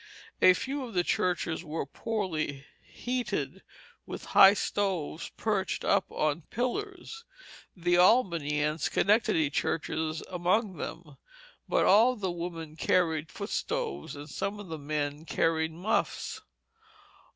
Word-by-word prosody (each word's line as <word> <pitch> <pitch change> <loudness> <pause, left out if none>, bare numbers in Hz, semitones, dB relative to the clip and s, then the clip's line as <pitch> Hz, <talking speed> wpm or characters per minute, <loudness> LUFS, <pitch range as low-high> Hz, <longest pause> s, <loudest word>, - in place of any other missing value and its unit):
A 185 - +8
few 275 +5 -3
of 235 -5 -8
the 175 - +3
churches 175 -2 0
were 160 -2 -3
poorly 155 -6 -3 0.2
heated 250 0 -3 0.5
with - - -7
high 195 +1 +9
stoves 185 -7 -2
perched 205 -4 -1
up 200 -1 +3
on 155 +2 0
pillars, 395 - -3 0.5
the 175 0 +2
Albany 170 - +3
and 150 +1 -1
Schenectady 185 -8 +2
churches 160 +1 -1
among 185 +2 0
them, 155 -2 -7 0.5
but - - +3
all 230 +6 +6
the 190 -5 -2
women 170 -2 -6
carried 160 -2 +1
foot - - -6
stoves, 70 - -3
and 145 +1 -8
some 200 +7 -3
of 200 -4 -9
the 160 -1 -5
men 145 0 -3
carried 160 -1 0
muffs. 220 - -2
175 Hz, 125 wpm, -29 LUFS, 155-205 Hz, 0.5 s, high